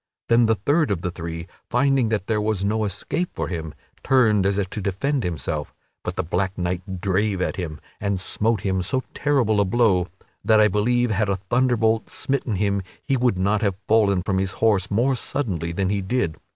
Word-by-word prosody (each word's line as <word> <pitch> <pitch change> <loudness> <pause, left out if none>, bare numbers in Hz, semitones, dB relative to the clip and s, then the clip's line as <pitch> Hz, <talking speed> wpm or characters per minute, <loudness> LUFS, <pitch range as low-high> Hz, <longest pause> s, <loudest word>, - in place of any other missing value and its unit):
Then 115 0 +5
the 110 - +3
third 145 - +1
of 90 -4 -1
the 90 - -1
three, 85 0 -6 0.2
finding 135 -1 +2
that 105 -4 -1
there 110 -1 0
was 105 -2 0
no 110 +1 +1
escape 105 - -2
for - - -3
him, 80 -3 -4 0.3
turned 110 -7 +3
as 100 0 +1
if 100 -2 0
to 105 - -4
defend 120 +8 -1
himself; 80 -3 -3 0.3
but - - -4
the - - -1
black 95 +4 -1
knight 90 +1 -3
drave 100 +1 +1
at 90 - -1
him, 80 -5 -5 0.2
and 100 -2 -1
smote 110 +3 0
him 95 -1 0
so 130 +8 -1
terrible 125 -8 +2
a - - +4
blow 95 -4 +2 0.4
that 110 -1 +4
I 105 0 +5
believe 120 +4 +1
had 105 0 +1
a 100 - +2
thunderbolt 115 +2 +1
smitten 135 -5 -1
him 100 0 0 0.2
he 135 - +1
would 125 -6 +1
not 100 +3 +1
have 100 -4 +1
fallen 100 -4 +3
from 95 0 0
his 95 -1 -1
horse 105 -4 +2
more 120 +6 +2
suddenly 100 - -2
than 95 +2 -1
he 100 0 0
did. 95 -5 -1
100 Hz, 200 wpm, -23 LUFS, 95-115 Hz, 0.4 s, Then